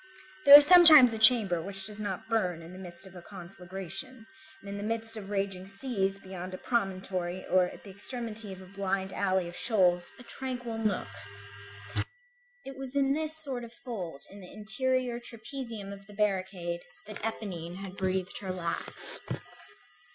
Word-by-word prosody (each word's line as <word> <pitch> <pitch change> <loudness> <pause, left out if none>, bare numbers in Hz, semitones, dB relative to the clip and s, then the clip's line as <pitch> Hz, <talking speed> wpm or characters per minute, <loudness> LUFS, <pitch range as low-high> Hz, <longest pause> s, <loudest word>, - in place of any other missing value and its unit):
There 280 0 +13
is 290 - +7
sometimes 310 -8 +9
a 220 - -4
chamber 220 -7 +7
which 195 +2 -5
does 210 0 -7
not 200 -3 -4
burn 185 -7 -1
in 170 +2 -11
the 185 - -10
midst 175 0 -10
of 190 - -13
a 175 - -9
conflagration, 195 +6 -7 0.3
and - - -15
in 200 0 -5
the 205 - -5
midst 225 +1 -3
of 205 -3 -8
raging 195 -2 -3
seas, 195 -2 -2
beyond 185 -1 -8
a - - -7
promontory 185 -5 -2
or 185 -1 +3
at - - -10
the 200 - -11
extremity 225 0 -7
of 190 0 -9
a - - -12
blind 195 0 -3
alley 190 -2 0
of 175 - -9
shoals, 180 -6 +4
a 250 - -13
tranquil 245 -3 -5
nook. 210 - -1 1.6
It 270 - -8
was 270 0 -8
in 275 -1 +3
this 315 +1 -1
sort 260 -4 -4
of 235 - -9
fold 180 - -6
in 200 - -12
the 180 -2 -12
interior 250 +3 -1
trapezium 230 -3 -8
of 195 0 -13
the 205 - -13
barricade, 185 -4 -1 0.2
that 215 0 -9
Éponine 185 -6 -5
had 195 0 -8
breathed 190 -1 -2
her 190 -2 -5
last. 175 -2 -5
200 Hz, 175 wpm, -29 LUFS, 185-230 Hz, 1.6 s, There